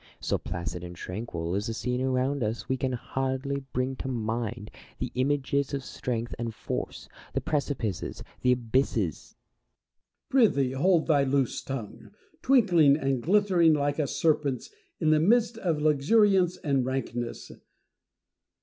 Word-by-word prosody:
So - - -1
placid 85 0 -5
and 90 0 -8
tranquil 90 -3 -5
is 100 +3 -1
the 115 - -3
scene 125 +1 -2
around 130 +1 0
us, 110 +1 -2
we 130 - +1
can 130 0 -1
hardly 135 +2 -2
bring 130 +1 -1
to - - -5
mind 115 -2 -3 0.3
the - - -4
images 140 +1 0
of 135 - -4
strength 120 -2 -4
and 115 -2 -3
force, - - -5 0.3
the - - +1
precipices, 135 - -2 0.2
the 125 - +3
abysses 115 - 0 1.0
Diogenes. 245 -5 +5
Prythee 135 -2 +2
hold 165 +5 +3
thy 145 -4 +3
loose 135 -2 0
tongue, 125 -6 -7 0.3
twinkling 175 - +5
and 135 -4 0
glittering 180 - +4
like 145 +1 0
a 150 - +1
serpent's 145 -3 0 0.3
in 155 -2 +3
the 155 - +5
midst 230 +6 +3
of 170 -7 0
luxuriance 180 +5 +4
and 140 -4 0
rankness 120 -2 -4
135 Hz, 140 wpm, -28 LUFS, 120-155 Hz, 1.0 s, Diogenes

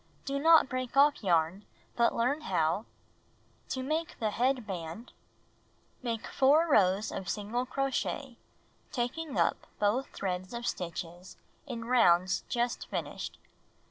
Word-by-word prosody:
Do 275 0 -1
not 320 0 +6
break 255 0 -4
off 285 -3 +5
yarn, 170 +1 +2 0.3
but 235 0 +4
(L2JEl\70tl - - -6
learn 255 +6 +1
how 165 - +1
fCM?^ 220 - -27
To 260 - -3
Make 315 +4 -2
the 215 -2 0
Head 250 +1 +1
Band 180 +3 -6 0.9
Make 230 -3 -3
4 290 +5 +4
rows 200 - +3
of 190 -2 -5
single 230 +5 -2
crochet, 270 -1 -2 0.5
taking 265 +5 -3
up - - +1
both 215 +6 +1
threads 185 +2 -4
of 235 0 -5
stitches 175 0 -5 0.3
in 235 -3 -5
rounds 185 -7 +4
just 240 0 -1
finished. - - -5
235 Hz, 135 wpm, -30 LUFS, 190-265 Hz, 0.9 s, not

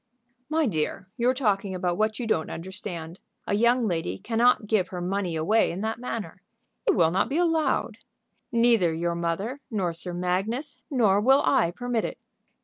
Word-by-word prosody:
"My 315 0 +2
dear, 190 - -2
you're 245 +3 +2
talking 200 -6 0
about 180 -1 -1
what 215 +2 0
you 245 - -3
don't 160 -8 0
understand. 170 -1 -6 0.3
A - - -1
young 235 +3 +3
lady 165 - -2
cannot 230 - +2
give 205 -3 +1
her 180 - -6
money 180 -1 -2
away 205 +8 +2
in 180 +3 -4
that 220 +1 -2
manner; 210 -7 -5 0.5
it - - +4
will 165 -4 +4
not 190 +5 +1
be 285 - -1
allowed. 330 -2 +1 0.5
Neither 230 -7 +4
your 170 +1 -1
mother, 170 +10 -2
nor 190 -6 -1
Sir 175 +1 -5
Magnus, 195 - -2
nor 215 -8 +3
will 265 +5 +5
I 250 -10 +3
permit 240 +4 -2
it." - - -5
205 Hz, 170 wpm, -26 LUFS, 175-240 Hz, 0.5 s, will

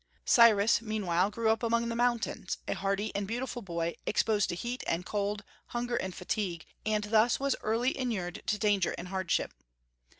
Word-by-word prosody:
Cyrus 225 -3 +6
meanwhile 200 -4 0
grew 220 +1 +1
up 220 - 0
among 235 0 +1
the 230 - -2
mountains, 235 -5 0
a - - 0
hardy 200 +2 -2
and 200 -1 -1
beautiful 245 +2 -3
boy, 170 -4 -3
exposed 210 -2 +2
to - - -2
heat 240 +7 -4
and 170 +2 -1
cold, 205 0 -2 0.2
hunger 240 0 -2
and 190 -5 -3
fatigue, 180 -3 -3 0.2
and 215 -1 +1
thus 220 +3 +3
was 275 0 +1
early 230 +4 +1
inured 210 -9 -3
to 210 - +1
danger 205 -3 +1
and 175 +1 -7
hardship. 190 -2 0
210 Hz, 170 wpm, -30 LUFS, 190-235 Hz, 0.2 s, Cyrus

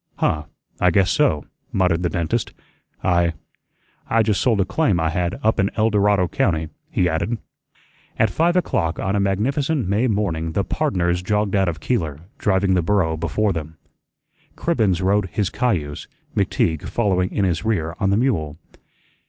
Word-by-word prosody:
"Huh, 75 -1 0 0.3
I 90 - +4
guess 95 +2 +3
so," 80 - +2 0.3
muttered 90 -3 +1
the 90 - 0
dentist. 85 +8 -2 0.5
"I 85 -2 +2 0.8
I 115 0 +3
just 105 -3 +1
sold 115 -5 +2
a 95 - +3
claim 95 - +1
I 80 0 +1
had 90 0 -2
up 110 +1 +2
in 100 0 +3
El 110 0 +2
Dorado 100 -3 +3
County," 80 -9 0 0.2
he 90 - +1
added. 90 +8 -1 0.8
At 110 -2 +2
five 170 - +2
o'clock 85 - 0
on 95 +1 -1
a - - +2
magnificent 130 - 0
May 105 +6 +2
morning 85 -7 -1
the 100 - +1
"pardners" 90 - 0
jogged 105 +1 0
out 95 -2 +3
of 80 -2 -5
Keeler, 80 - -1 0.2
driving 95 -2 +2
the 90 - +3
burro 85 -2 +1
before 85 +6 0
them. 80 -1 -6 0.8
Cribbens 105 - +1
rode 100 0 +2
his 100 -3 -1
cayuse, 80 -13 -1 0.3
McTeague 80 -2 0
following 95 -5 +1
in 100 - 0
his 85 -3 -1
rear 85 -7 -1
on 95 - +1
the 100 - +3
mule. 85 - 0
95 Hz, 165 wpm, -21 LUFS, 85-110 Hz, 0.8 s, I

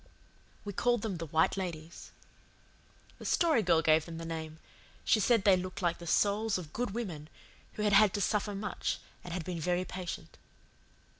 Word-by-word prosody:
We 205 - -4
called 240 +2 +1
them 205 -5 -2
the 165 0 -5
White 160 +2 +2
Ladies. 170 -3 -6 1.1
The - - -9
Story 320 -9 +3
Girl 165 -4 +3
gave 155 0 +4
them 165 -1 -7
the 165 - -6
name. 160 -1 -5 0.5
She 220 - +4
said 225 0 +3
they 195 -2 +6
looked 185 +1 -5
like 170 -1 +1
the 170 - -9
souls 210 +5 +2
of 165 -4 -8
good 245 0 -1
women 180 -9 -5 0.4
who 210 - -3
had 210 -1 +2
had 210 0 +7
to 205 - -1
suffer 210 0 0
much 205 +1 -2 0.3
and 175 - -8
had 170 -2 -3
been 175 -2 -4
very 180 +3 0
patient. 180 - -7
185 Hz, 180 wpm, -31 LUFS, 165-210 Hz, 1.1 s, had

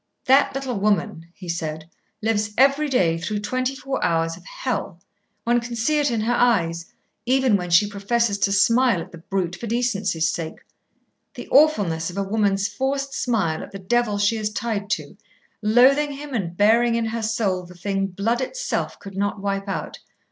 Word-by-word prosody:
"That 270 +1 +4
little 260 -5 -3
woman," 205 -4 0
he 185 - -11
said, 160 -2 -4 0.4
"lives 210 -1 0
every 280 +3 +4
day 170 -11 +2
through 205 +4 -3
twenty 255 +5 -1
four 270 0 -3
hours 165 0 +1
of 175 - -15
hell. 200 -8 -4 0.4
One 240 +2 +2
can 235 0 -6
see 300 +7 +1
it 290 -1 +2
in 230 -3 -1
her 230 +3 +1
eyes, 170 -9 +1 0.4
even 260 -3 +3
when 180 -2 -2
she 170 +4 +5
professes 205 +1 0
to 200 - +2
smile 230 +1 +4
at - - -8
the 170 - -11
brute 180 0 -2
for 230 - -7
decency's 210 -8 0
sake. 165 -1 -4 0.7
The - - -8
awfulness 205 - +3
of 180 - -9
a 200 - 0
woman's 200 -1 +1
forced 275 +1 -2
smile 200 -10 0
at - - -8
the 195 - -7
devil 210 +2 0
she 205 +3 +2
is 215 -1 -1
tied 210 -3 -3
to, 160 -2 -3 0.4
loathing 260 +7 +4
him 285 0 -8
and 175 -7 -3
bearing 230 +3 +4
in 230 -1 0
her 225 +1 -3
soul 215 -4 0
the 180 - -13
thing, 195 +1 -1
blood 210 +6 -1
itself - - -3
could 195 -1 -11
not 200 +1 -1
wipe 195 0 -2
out. 195 - -4
210 Hz, 185 wpm, -23 LUFS, 190-245 Hz, 0.7 s, she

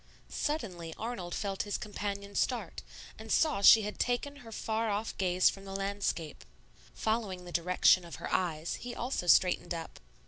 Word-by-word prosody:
Suddenly 185 - -3
Arnold 215 -6 -4
felt 195 -1 -2
his 205 - -2
companion 200 -1 -5
start, - - -1 0.4
and - - -7
saw 305 -11 +3
she 220 +2 +9
had 210 +1 -5
taken 270 +4 -1
her 235 -5 -12
far 220 +1 -1
off 210 +2 -2
gaze 185 -1 +3
from 195 - -11
the 195 0 -7
landscape. 195 -5 -2 0.5
Following 210 -5 -2
the 175 - -9
direction 180 +1 +4
of 170 - -8
her - - -5
eyes, 165 -3 -1
he 245 0 -6
also 240 -7 -3
straightened 180 0 +4
up. 165 -1 -7
200 Hz, 165 wpm, -31 LUFS, 180-225 Hz, 0.5 s, she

